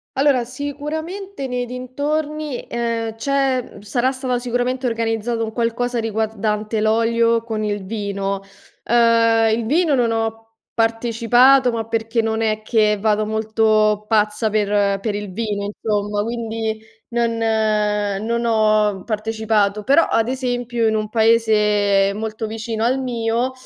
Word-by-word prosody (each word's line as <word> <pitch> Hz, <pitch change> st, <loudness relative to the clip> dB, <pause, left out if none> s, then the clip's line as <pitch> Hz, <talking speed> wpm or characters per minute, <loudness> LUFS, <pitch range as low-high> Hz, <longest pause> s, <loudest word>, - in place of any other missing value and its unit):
Allora, 270 Hz, -2 st, +3 dB
sicuramente, 300 Hz, +7 st, -5 dB
nei 250 Hz, -1 st, -3 dB
dintorni, 290 Hz, +3 st, -3 dB
ehm, 230 Hz, -1 st, -2 dB
c'è 265 Hz, 0 st, -1 dB
sarà 240 Hz, +5 st, 0 dB
stata 255 Hz, -2 st, -2 dB
sicuramente 250 Hz, +1 st, -1 dB
organizzato 230 Hz, 0 st, -1 dB
un 220 Hz, -1 st, -4 dB
qualcosa 240 Hz, +1 st, -1 dB
riguardante 220 Hz, -1 st, -2 dB
l'olio 230 Hz, +1 st, +2 dB
con 220 Hz, -2 st, -3 dB
il 205 Hz, -2 st, -3 dB
vino. 200 Hz, -1 st, -3 dB, 0.4 s
Ehm, 230 Hz, -1 st, +3 dB
il 230 Hz, -, -3 dB
vino 315 Hz, +3 st, +2 dB
non 240 Hz, -4 st, +2 dB
ho 225 Hz, 0 st, -2 dB, 0.3 s
partecipato, 240 Hz, +3 st, +3 dB
ma 225 Hz, -1 st, -3 dB
perché 225 Hz, 0 st, -1 dB
non 220 Hz, 0 st, -1 dB
è 215 Hz, -1 st, 0 dB
che 215 Hz, -1 st, +2 dB
vado 215 Hz, 0 st, +1 dB
molto 215 Hz, -1 st, +1 dB
pazza 215 Hz, 0 st, +1 dB
per 205 Hz, -1 st, +1 dB
per 215 Hz, 0 st, -2 dB
il 205 Hz, -2 st, -5 dB
vino 205 Hz, -1 st, -2 dB
insomma, 205 Hz, 0 st, -2 dB
quindi 225 Hz, -1 st, -3 dB, 0.3 s
non 235 Hz, -1 st, 0 dB
non 215 Hz, 0 st, 0 dB
ho 215 Hz, -3 st, +2 dB
partecipato, 215 Hz, -2 st, 0 dB
però, 280 Hz, +8 st, +5 dB
ad 225 Hz, 0 st, +1 dB
esempio, 245 Hz, -3 st, -1 dB
in 220 Hz, -, +1 dB
un 215 Hz, -1 st, -2 dB
paese 210 Hz, -3 st, +3 dB
molto 220 Hz, +1 st, -4 dB
vicino 220 Hz, 0 st, -4 dB
al 255 Hz, +3 st, +1 dB
mio 235 Hz, 0 st, -1 dB
225 Hz, 130 wpm, -20 LUFS, 215-245 Hz, 0.4 s, però